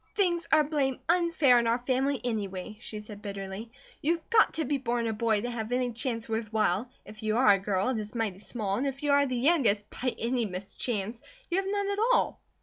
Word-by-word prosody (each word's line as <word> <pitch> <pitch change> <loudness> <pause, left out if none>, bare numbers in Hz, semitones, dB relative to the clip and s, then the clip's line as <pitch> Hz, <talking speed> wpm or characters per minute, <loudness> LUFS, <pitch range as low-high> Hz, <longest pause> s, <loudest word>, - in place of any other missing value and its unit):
"Things 350 -5 +1
are 310 -1 +6
blame 280 -3 0
unfair 335 -7 +4
in 235 - 0
our 230 +1 +3
family, 260 +2 0
anyway!" 210 -4 -3
she 215 -2 -6
said, 210 -1 -10
bitterly. 200 +2 -6 0.3
"You 325 +4 +2
have 335 - -13
got 445 -1 +5
to 320 - 0
be 280 +1 0
born 240 -2 -1
a 225 - 0
boy 220 -1 +1
to 245 +2 -3
have 225 -1 -4
any 250 0 +1
chance 230 0 -3
worth 220 -1 -3
while; 215 +1 +1 0.2
if 215 0 -11
you 215 0 0
are 250 -4 +5
a 195 - +1
girl 195 +2 0
it 250 -4 0
is 210 +2 -7
mighty 215 -5 -2
small, 205 -2 -3
and 275 - 0
if 275 +1 -5
you 290 - +2
are 280 0 +4
the 255 -1 -2
youngest, 240 -8 +3
by 255 -1 -2
any 235 0 0
mischance, 200 +4 -3 0.3
you 350 - +2
have 385 0 0
none 405 0 0
at 400 - -2
all. - - +1
235 Hz, 230 wpm, -29 LUFS, 215-280 Hz, 0.3 s, are